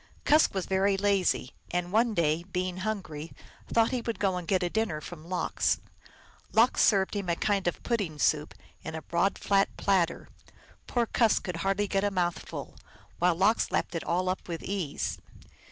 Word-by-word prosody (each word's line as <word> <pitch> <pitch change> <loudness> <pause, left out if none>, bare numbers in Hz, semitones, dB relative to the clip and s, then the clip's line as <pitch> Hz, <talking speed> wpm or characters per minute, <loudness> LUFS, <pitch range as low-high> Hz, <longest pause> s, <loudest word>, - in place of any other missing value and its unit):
Kusk 305 -7 +4
was 190 - -1
very 195 +1 +2
lazy, 195 -10 +1 0.2
and 180 0 -2
one 225 +1 +2
day, 165 -1 +1
being 180 0 -2
hungry, 185 -7 -4 0.3
thought 230 +1 +3
he 250 -2 -1
would 230 -1 -3
go 195 -2 +1
and 180 -2 -5
get 185 -2 +2
a - - +2
dinner 220 -9 0
from 165 +1 -10
Lox. 185 - 0 0.7
Lox 230 +3 +4
served 195 -1 +3
him 200 -3 -2
a 170 - +2
kind 200 0 0
of 175 - -2
pudding 200 -10 -1
soup 150 0 +1 0.3
in 160 - -5
a 160 - -6
broad, 175 +4 +1
flat 195 -1 +2
platter. 180 -4 +1 0.6
Poor 240 -1 +1
Kusk 230 -1 +2
could 180 -2 -4
hardly 195 +3 0
get 195 0 0
a 205 - +2
mouthful, 175 -3 -3 0.4
while 175 0 +3
Lox 200 +6 +3
lapped - - -1
it 165 - -3
all 180 +2 0
up 185 +1 -2
with 170 -2 -5
ease. 185 -7 -3
190 Hz, 180 wpm, -29 LUFS, 170-205 Hz, 0.7 s, Kusk